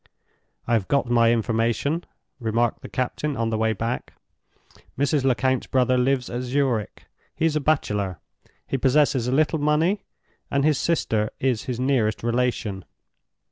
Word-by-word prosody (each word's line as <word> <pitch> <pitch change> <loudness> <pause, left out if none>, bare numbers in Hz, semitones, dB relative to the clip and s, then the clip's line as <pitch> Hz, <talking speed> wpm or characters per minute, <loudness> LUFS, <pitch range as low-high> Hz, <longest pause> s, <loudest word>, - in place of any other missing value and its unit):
"I 120 - 0
have 110 -5 +1
got 140 -4 +1
my 115 -1 +5
information," 115 +7 0 0.4
remarked 115 0 0
the - - -9
captain 135 +3 -2
on 115 0 0
the 110 - 0
way 110 0 +2
back. 115 +3 -3 0.8
"Mrs. 140 0 +1
Lecount's 130 -1 +1
brother 130 -1 +2
lives 125 0 +1
at 120 +1 -4
Zurich. 125 -4 -1 0.3
He - - 0
is 160 -2 +1
a - - +2
bachelor; 105 - 0 0.5
he 135 - -2
possesses 135 -2 +3
a - - 0
little 155 +3 +2
money, 160 +7 +2 0.5
and 140 0 +1
his 150 -3 +3
sister 110 -10 0
is 125 -5 0
his 125 -2 -3
nearest 125 -6 +1
relation. 120 -5 -1
125 Hz, 150 wpm, -24 LUFS, 115-140 Hz, 0.8 s, my